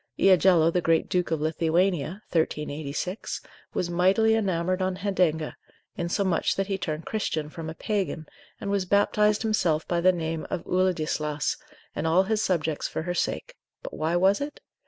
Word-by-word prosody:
Iagello 180 -3 +5
the 180 - +2
great 165 -1 +2
Duke 180 -1 0
of 160 -2 -1
Lithuania, 170 +3 0
1386, 155 +3 -2 0.4
was 175 -1 -1
mightily 190 +6 +3
enamoured 185 -4 0
on 185 0 0
Hedenga, 180 -6 0 0.4
insomuch 175 0 0
that 195 - 0
he 195 0 -2
turned 155 -1 -4
Christian 160 -8 -2
from 160 -1 -6
a 160 - -7
Pagan, 195 -5 -2 0.3
and 200 - -3
was 200 -2 +1
baptised 210 +2 +2
himself 175 -8 +1
by 175 -1 0
the 185 +1 +6
name 165 -2 -3
of - - -3
Uladislaus, 155 -5 0 0.4
and 160 - -1
all 175 +4 +4
his 215 +2 0
subjects 160 -6 0
for - - -4
her 175 +1 -2
sake: - - -2 0.3
but - - -7
why 160 +2 -1
was 190 +5 +3
it? 290 +1 -5
175 Hz, 160 wpm, -26 LUFS, 160-195 Hz, 0.4 s, the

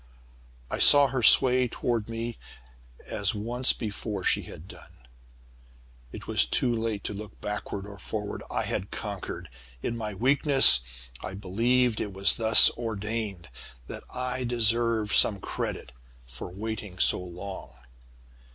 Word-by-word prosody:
"I - - -3
saw 145 -1 +6
her 130 -1 -2
sway 125 +2 +5
toward 115 -2 -3
me 115 +1 -6 0.7
as 100 +1 -2
once 120 +5 0
before 105 -2 -5
she - - +2
had 80 - -12
done. - - -16 1.1
It - - -10
was - - +2
too 120 - +1
late 110 -3 -3
to - - -4
look 105 +1 -10
backward 105 -1 -5
or 100 0 -12
forward. 105 -1 -5
I - - -2
had 95 - -4
conquered. 100 -3 -7 0.4
In 120 - -3
my 110 -3 -6
weakness 135 - +6 0.4
I 95 - -7
believed 115 +5 0
it 100 - -5
was 95 0 +3
thus 110 -1 +8
ordained 110 - -5 0.4
that - - -9
I 125 0 -4
deserved 115 -2 0
some 100 -2 +3
credit - - -5 0.3
for 60 +6 -9
waiting 105 0 -7
so - - +3
long. 90 0 -9
110 Hz, 135 wpm, -26 LUFS, 100-120 Hz, 1.1 s, thus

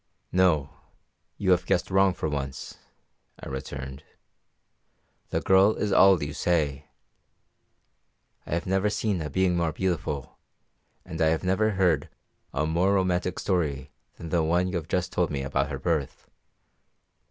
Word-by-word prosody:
"No, 85 -6 +2 0.7
you 95 -2 +1
have 90 0 +2
guessed 90 - 0
wrong 95 -1 +3
for 85 - -2
once," 70 -3 -5 0.6
I - - -9
returned. 65 0 -6 1.3
"The - - -1
girl 95 +3 +4
is 105 - -2
all 95 -4 +6
you 70 - -4
say; 75 -5 0 1.6
I - - -1
have 85 - -3
never 95 +2 +1
seen 105 -3 -1
a 75 - -4
being 90 +4 +1
more 85 -2 0
beautiful, 80 -6 -3 0.7
and 80 -3 -6
I 80 - +4
have 80 +2 +1
never 105 +4 +1
heard 90 -6 +2 0.4
a 75 - -1
more 90 +5 +2
romantic 90 -1 0
story 75 -7 -1 0.2
than 85 - -8
the 85 0 +2
one 90 +3 +1
you 90 - -2
have 80 -2 -6
just 90 +1 -1
told 90 -2 +1
me 70 -2 -3
about 70 +1 -1
her 70 - -4
birth. 75 -1 -2
85 Hz, 150 wpm, -26 LUFS, 75-95 Hz, 1.6 s, all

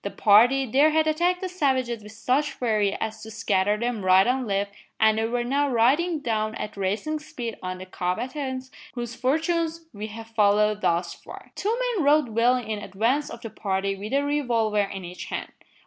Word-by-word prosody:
The 200 - -2
party 240 +8 +5
there 275 +6 +4
had 315 0 +2
attacked 345 +4 +1
the 375 - -2
savages 260 -10 0
with 210 +1 -12
such 275 +6 0
fury 215 -5 0
as 220 0 -4
to 220 - -9
scatter 210 -2 +1
them 235 -2 -2
right 185 +1 +6
and 255 0 0
left 200 0 -1 0.3
and 220 0 +4
they 225 - +1
were 240 +1 -1
now 280 +4 +1
riding 290 +8 +2
down 220 -3 -1
at 210 - -5
racing 210 +11 -2
speed 240 -7 -6
on 185 0 -4
the 185 - -8
combatants, 260 +9 -3 0.2
whose 240 -1 -4
fortunes 325 +5 0
we 210 +1 -5
have 225 +1 -9
followed 210 -1 +3
thus 170 0 0
far. - - -12
Two 440 +4 -1 0.2
men 345 - +1
rode 290 -2 +4
well 230 +3 +3
in 220 -4 -3
advance 230 +9 0
of - - -9
the 225 - -7
party 195 -1 -2
with 205 +2 -7
a 280 +1 +2
revolver 235 -8 +1
in 195 -2 -4
each 180 +1 -8
hand. - - -5
230 Hz, 195 wpm, -25 LUFS, 210-280 Hz, 0.3 s, right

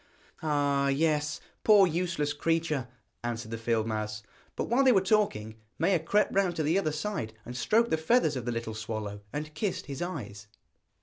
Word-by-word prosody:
'Ah, 145 -2 +1
yes, 150 +1 +1 0.2
poor 210 -3 +7
useless 170 -4 -1
creature,' 155 -3 0 0.4
answered 115 -2 -4
the 115 - -3
field 115 -1 +1
mouse. 110 -1 -3 0.3
But - - -1
while 245 +4 +2
they 260 - +6
were 200 - +5
talking, 185 - +1 0.2
Maia 175 +2 +3
crept 205 +7 +1
round 190 -3 +2
to 160 - 0
the 160 +6 +3
other 155 -5 0
side 150 - -3
and 125 - -7
stroked 220 - +2
the 160 - +3
feathers 160 - +2
of 125 -3 -4
the 120 - -1
little 115 -1 -3
swallow, 110 -2 -5
and 150 +1 -5
kissed 205 +1 -2
his 140 +1 -6
eyes. 105 - -5
150 Hz, 180 wpm, -29 LUFS, 115-180 Hz, 0.4 s, poor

